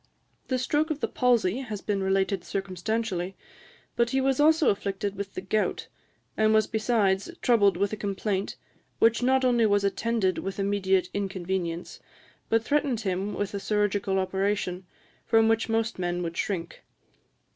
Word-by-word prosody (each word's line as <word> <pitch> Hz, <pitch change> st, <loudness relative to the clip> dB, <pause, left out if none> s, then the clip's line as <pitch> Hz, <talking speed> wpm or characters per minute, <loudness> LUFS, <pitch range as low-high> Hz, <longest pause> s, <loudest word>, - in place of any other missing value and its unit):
The 255 Hz, -, 0 dB
stroke 295 Hz, +5 st, 0 dB
of 310 Hz, -2 st, -2 dB
the -, -, -1 dB
palsy 240 Hz, -4 st, +2 dB
has 220 Hz, -6 st, -5 dB
been 200 Hz, 0 st, -2 dB
related 190 Hz, 0 st, 0 dB
circumstantially; 195 Hz, 0 st, -3 dB, 0.6 s
but 235 Hz, 0 st, +2 dB
he 265 Hz, -, +1 dB
was 265 Hz, 0 st, +1 dB
also 315 Hz, +1 st, +5 dB
afflicted 200 Hz, 0 st, -3 dB
with 200 Hz, 0 st, -6 dB
the -, -, -3 dB
gout, 210 Hz, +3 st, -1 dB, 0.5 s
and 220 Hz, 0 st, +3 dB
was 215 Hz, -1 st, +4 dB
besides 215 Hz, -4 st, +1 dB
troubled 205 Hz, -5 st, +4 dB
with 200 Hz, +1 st, 0 dB
a -, -, -3 dB
complaint 200 Hz, -1 st, -2 dB, 0.4 s
which 230 Hz, +1 st, +3 dB
not 260 Hz, +1 st, +3 dB
only 240 Hz, -3 st, +4 dB
was 205 Hz, -1 st, +2 dB
attended 200 Hz, -1 st, 0 dB
with 195 Hz, 0 st, -5 dB
immediate 195 Hz, -2 st, +1 dB
inconvenience, 185 Hz, -3 st, -3 dB, 0.5 s
but 225 Hz, 0 st, +2 dB
threatened 280 Hz, -4 st, 0 dB
him 195 Hz, 0 st, -2 dB
with 205 Hz, 0 st, -3 dB
a 200 Hz, -, -2 dB
chirurgical 205 Hz, -1 st, 0 dB
operation, 190 Hz, -1 st, -1 dB, 0.4 s
from 225 Hz, -1 st, +4 dB
which 225 Hz, 0 st, +1 dB
most 225 Hz, -2 st, 0 dB
men 175 Hz, 0 st, -1 dB
would 170 Hz, 0 st, -4 dB
shrink. 170 Hz, -4 st, -3 dB
205 Hz, 155 wpm, -27 LUFS, 190-225 Hz, 0.6 s, also